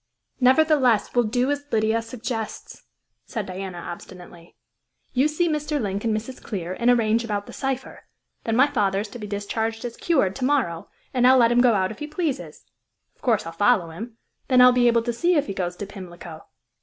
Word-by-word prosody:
"Nevertheless, 260 -4 +3
we'll 245 -1 +3
do 245 +5 +1
as 285 0 -2
Lydia 220 +1 +2
suggests," 230 -1 -6 0.4
said 220 -5 -4
Diana 185 -1 -6
obstinately. 175 0 -10 0.6
"You 265 +3 +3
see 305 +3 0
Mr. 300 -1 -1
Link 200 -3 -3
and 225 - +1
Mrs. 240 +4 -8
Clear, 185 -5 -4
and 235 - +3
arrange 230 -1 +3
about 205 -3 -3
the - - -11
cypher. 270 -1 -4 0.4
Then 225 - -1
my 260 +3 +6
father 205 -9 0
is 210 - -7
to 240 - -9
be 210 - -6
discharged 220 +3 -3
as 235 -1 -5
cured 265 - +1
to 265 - -4
morrow, 250 - 0 0.2
and 250 -1 +4
I'll 260 +1 +7
let 235 -2 +5
him 240 0 +4
go 240 -3 +4
out 185 0 0
if 220 - -10
he 300 - -5
pleases. 305 -3 -4 0.5
Of - - -35
course, 230 -5 +1
I'll 165 - -5
follow 185 -1 +2
him; 225 +7 -8 0.3
then 255 -1 +4
I'll 250 0 +9
be 245 -1 +3
able 235 -1 +3
to 240 0 -2
see 345 +9 +2
if 295 -2 +2
he 200 - -4
goes 180 -2 -3
to 205 - -6
Pimlico." 175 -5 -10
230 Hz, 205 wpm, -24 LUFS, 200-255 Hz, 0.6 s, I'll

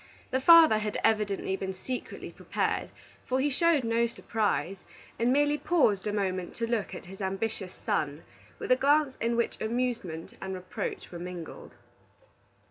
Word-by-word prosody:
The 260 - +1
father 325 -7 +8
had 210 -1 -2
evidently 210 -3 +1
been 190 -1 -4
secretly 250 +7 -6
prepared, - - -2 0.4
for 260 +1 +1
he 285 +2 +1
showed 325 0 +3
no 230 +1 +2
surprise, 210 -6 -1 0.4
and 235 +2 +3
merely 290 +2 +3
paused 265 - +2
a - - 0
moment 185 -3 -2
to 230 - -1
look 230 -3 -2
at - - -9
his 195 +3 -10
ambitious 195 0 -3
son 145 +1 -2 0.3
with - - -4
a - - +8
glance 285 +1 +3
in 235 +1 +1
which 235 0 -1
amusement 220 -8 -2
and 190 0 -4
reproach 185 0 -5
were 175 - -7
mingled. 175 -1 -8
220 Hz, 155 wpm, -29 LUFS, 190-255 Hz, 0.4 s, father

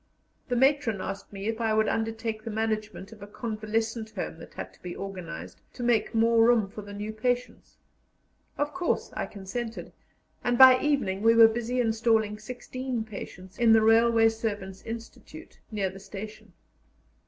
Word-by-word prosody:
The 245 - +1
matron 265 -4 +2
asked 195 +1 -6
me 195 0 -7
if 225 +1 -2
I 220 -1 +1
would 220 0 +3
undertake 225 -1 -2
the 230 - -5
management 215 -3 -3
of 220 -2 -13
a 205 - -8
convalescent 220 +1 -3
home - - -5
that - - -13
had - - -7
to - - -24
be 180 -1 -6
organized 175 - -7
to 245 - -6
make 235 -2 +1
more 230 0 +4
room 230 -3 +4
for 205 +2 -9
the 205 0 -10
new 210 +2 -5
patients. 245 +3 -3 0.8
Of 290 +1 -1
course 360 -1 -1
I - - -2
consented, 220 +4 -6 0.5
and 245 0 +1
by 260 0 +9
evening 275 -10 0
we 230 +1 +5
were 230 -1 +9
busy 240 +2 -2
installing 220 -2 +1
sixteen 250 +1 -5
patients 195 -3 -10
in 230 -2 +6
the 220 -1 +5
railway 225 0 +5
servants' 205 -4 -4
institute, 230 0 -9
near 200 -4 -1
the 190 - -11
station. 210 0 -9
225 Hz, 165 wpm, -27 LUFS, 210-235 Hz, 0.8 s, by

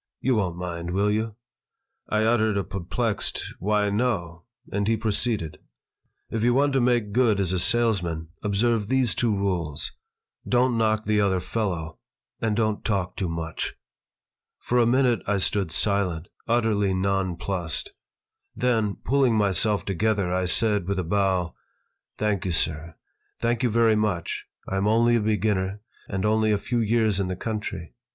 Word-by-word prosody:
"You 130 - +1
won't 95 -6 0
mind, 85 -1 -4
will 100 +1 +2
you?" 110 0 -1 0.7
I 110 0 +2
uttered 110 -2 +2
a 100 - 0
perplexed, 100 +4 -2
"Why, 105 +1 +1
no"; 100 -7 -1 0.3
and 100 0 -1
he 115 0 +2
proceeded: 110 -5 -2 0.7
"If 110 - -1
you 120 +1 +3
want 140 +1 +3
to 135 - +3
make 120 -4 +2
good 110 -3 +3
as 95 -2 0
a 90 - +1
salesman, 95 -7 0
observe 105 +1 +1
these 130 -1 +2
two 120 - 0
rules: 90 -7 -1 0.6
Don't 125 0 +3
knock 110 -1 +1
the 105 0 +2
other 95 -2 +2
fellow 90 -6 -3 0.4
and 110 -2 +1
don't 110 -1 0
talk 95 -4 -1
too 95 - -2
much." 80 -1 -4 0.8
For 125 - 0
a 115 - +4
minute 125 -3 +3
I 100 0 +2
stood 95 -2 0
silent, 90 -5 0 0.2
utterly 110 -5 +2
nonplussed. 95 -3 -1 0.6
Then, 115 -5 +1
pulling 130 -2 +3
myself 105 0 +2
together, 100 -1 0
I 90 0 +1
said, 105 0 +2
with 100 0 -1
a 95 - 0
bow: 95 -1 0 0.6
"Thank 105 -3 0
you, 95 - -1
sir. 80 -1 -1 0.4
Thank 120 0 0
you 125 - +2
very 115 0 +4
much. 105 -6 -1 0.2
I 95 - -2
am 100 +2 +1
only 115 +2 +4
a 115 - +2
beginner, 105 -2 0 0.3
and 95 0 -2
only 110 0 +3
a 105 - +3
few 120 +4 -2
years 110 -2 +2
in 95 - 0
the 95 - -3
country. 105 -4 -5
105 Hz, 160 wpm, -25 LUFS, 95-115 Hz, 0.8 s, a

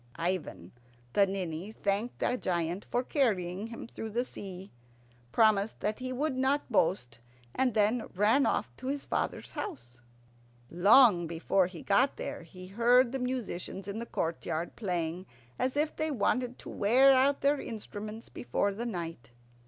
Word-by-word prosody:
Ivan 165 - -3 0.4
the 200 +4 +5
Ninny 185 0 -4
thanked 210 +2 -2
the 245 - +2
giant 175 -3 -2
for 245 - 0
carrying 205 - 0
him 230 0 -8
through 225 -1 -7
the 240 +4 -1
sea, 190 -4 -8 0.6
promised 215 -2 +3
that 210 +3 -1
he 255 0 -4
would 275 +2 -1
not 265 +1 0
boast, 125 - +1 0.3
and 255 -4 +1
then 220 +2 +2
ran 215 +8 +4
off - - -1
to 260 - -7
his 280 +1 -2
father's - - -2
house. 120 - -7 0.7
Long 200 0 +6
before 175 +3 +1
he 175 -4 -10
got 255 +7 +3
there - - -5
he 185 +2 -12
heard 235 +5 +4
the 270 - -2
musicians 235 -7 -4
in 205 +2 -4
the 235 - -5
courtyard 165 0 -3
playing 180 -3 -3 0.3
as 260 +2 0
if 300 +1 +1
they 315 0 -1
wanted 250 -1 0
to - - -10
wear 255 +7 +5
out 270 +2 +3
their 280 +1 +2
instruments 215 0 -7
before 120 - -1
night. 175 - -5
210 Hz, 150 wpm, -30 LUFS, 180-255 Hz, 0.7 s, Long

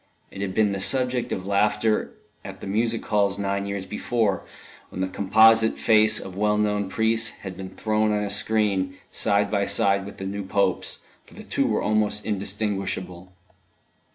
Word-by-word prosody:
It 100 - -8
had 95 -2 -3
been 110 -2 +3
the 100 -1 -3
subject 125 +1 0
of 95 - -3
laughter 105 +2 +1 0.3
at - - -9
the - - -8
music 115 +3 -1
halls 100 -2 +1
nine 100 0 -2
years 100 -1 -4
before, 105 -1 -1 0.5
when - - -8
the 95 - 0
composite 110 +4 +4
face 110 0 +4
of 95 - -9
well 105 +1 +1
known 105 -2 0
priests 110 +1 +1
had 95 -2 -6
been 95 0 -7
thrown 110 +2 0
on 105 0 0
a 100 - -3
screen, 100 -3 0
side 100 0 +1
by 100 -2 +1
side 100 0 +1
with - - -10
the 95 - -6
new 100 +1 -4
Pope's, 95 -1 0 0.3
for - - -17
the - - -10
two - - 0
were - - 0
almost 105 -1 0
indistinguishable. 95 -3 -3
100 Hz, 175 wpm, -24 LUFS, 95-110 Hz, 0.5 s, composite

